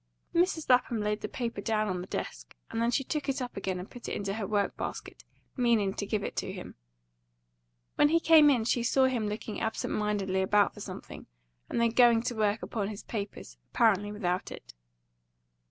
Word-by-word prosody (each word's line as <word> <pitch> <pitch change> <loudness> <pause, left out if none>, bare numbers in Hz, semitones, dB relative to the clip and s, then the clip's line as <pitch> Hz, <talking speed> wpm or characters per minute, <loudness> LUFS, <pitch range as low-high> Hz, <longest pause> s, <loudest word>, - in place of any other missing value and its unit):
Mrs. 340 -2 +1
Lapham 250 -2 +3
laid 210 0 -1
the - - -3
paper 235 -4 -4
down 215 0 0
on 180 -2 -2
the 180 - -8
desk, - - -6 0.2
and 225 - -2
then 235 - +2
she 245 +3 +1
took 295 +1 -3
it 270 - 0
up 250 -1 -5
again 190 -2 -2
and 180 +2 -6
put 245 - -8
it - - -3
into 200 -1 -2
her 210 -2 -3
work 205 -2 0
basket, - - -6 0.3
meaning 230 -6 +2
to 205 - -4
give 210 -1 -1
it - - -4
to - - -2
him. - - -8 1.2
When 295 - +5
he 330 +2 +4
came 320 -3 +7
in 250 -5 +3
she 240 +1 +1
saw 260 +3 +3
him 245 -5 0
looking 210 0 -5
absent 220 -1 -2
mindedly 200 -3 0
about 205 +2 +3
for - - -11
something, - - -8 0.4
and - - -1
then 235 -1 +3
going 235 -1 +5
to 240 - -2
work 215 0 +1
upon 205 -4 -2
his 210 0 -7
papers, 200 - -6
apparently 205 -3 +3
without 185 -3 -2
it. - - -10
220 Hz, 200 wpm, -29 LUFS, 205-245 Hz, 1.2 s, came